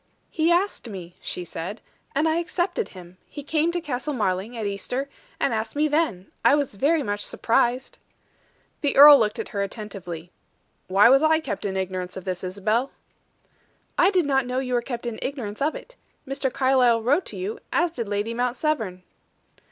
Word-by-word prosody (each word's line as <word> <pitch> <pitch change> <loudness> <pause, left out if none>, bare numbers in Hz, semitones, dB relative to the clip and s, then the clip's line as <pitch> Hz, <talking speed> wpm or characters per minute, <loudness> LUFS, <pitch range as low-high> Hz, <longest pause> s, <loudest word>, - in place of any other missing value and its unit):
"He 325 +1 +2
asked 350 - 0
me," 180 -4 -8
she 180 - -4
said, 175 +6 -6 0.4
"and 305 +3 +2
I 320 +1 +2
accepted 355 +4 -2
him. 180 -1 -13
He 290 - -8
came 315 +3 +1
to 350 - -1
Castle 295 -2 -3
Marling 205 +1 -1
at 220 - -3
Easter, 225 +7 -3 0.3
and - - +1
asked 220 +4 -3
me 300 +1 +2
then. 295 - -1
I - - +6
was 285 -5 -1
very 290 +9 +2
much 205 -2 -2
surprised." 240 +2 0 0.8
The 285 - 0
earl 290 0 +11
looked 215 -2 0
at - - -4
her 200 - -2
attentively. 195 -5 -6 0.6
"Why 195 +3 +6
was 270 +3 +6
I 315 0 +4
kept 205 -12 -5
in 190 -1 -2
ignorance 185 -1 -3
of 190 - -8
this, 185 -1 -3
Isabel?" 210 +7 0 1.1
"I 360 - +5
did 365 -5 +2
not 270 -3 +1
know 250 +1 -2
you 255 -1 -2
were 240 - +2
kept 240 -1 -6
in 235 -2 -4
ignorance 245 -6 -5
of 300 +3 +1
it. - - -11 0.3
Mr. 270 -1 -2
Carlyle 250 -4 +3
wrote 285 +10 +2
to - - -8
you, 410 +5 -4
as 340 0 +2
did 235 -9 -5
Lady 205 +3 -1
Mount 245 +1 -1
Severn." 220 - -2
245 Hz, 185 wpm, -24 LUFS, 200-300 Hz, 1.1 s, earl